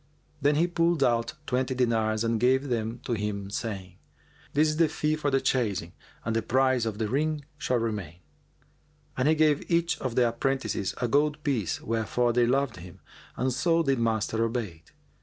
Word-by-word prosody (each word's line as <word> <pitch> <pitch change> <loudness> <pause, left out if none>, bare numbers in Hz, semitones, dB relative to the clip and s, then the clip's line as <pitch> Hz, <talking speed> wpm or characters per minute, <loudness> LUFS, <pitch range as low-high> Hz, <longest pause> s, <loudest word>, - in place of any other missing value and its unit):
Then 145 +1 +3
he 165 +3 +3
pulled 170 -3 +1
out 120 -2 +1
twenty 130 0 -1
dinars 110 -3 +1
and 115 -1 0
gave 130 +3 +2
them 115 0 -2
to 120 - -2
him, 100 -2 -3
saying, 95 -6 -5 0.6
"This 155 +2 +3
is 155 - -2
the 165 -2 +4
fee 155 0 0
for 150 -2 -1
chasing 100 -11 -1 0.3
and 115 0 -1
the 115 - +2
price 130 +1 +2
of 105 -2 -3
the 110 -1 -1
ring 150 +4 -1
shall 125 -4 +1
remain."[FN#404] 105 -8 -3 1.0
And 130 +2 +2
he 160 - +4
gave 155 -2 +2
each 170 +1 +1
of 130 -4 -3
the 125 -1 +4
apprentices 115 -5 -1
a 120 - 0
gold 150 +4 +1
piece, 120 - -1
wherefore 115 +2 0
they 120 0 +3
loved 135 0 +1
him, 90 0 -11 0.4
and 130 0 0
so 165 +6 +2
did 135 -4 +1
Master 110 -1 0
Obayd. 110 -9 -4
125 Hz, 175 wpm, -27 LUFS, 110-145 Hz, 1.0 s, the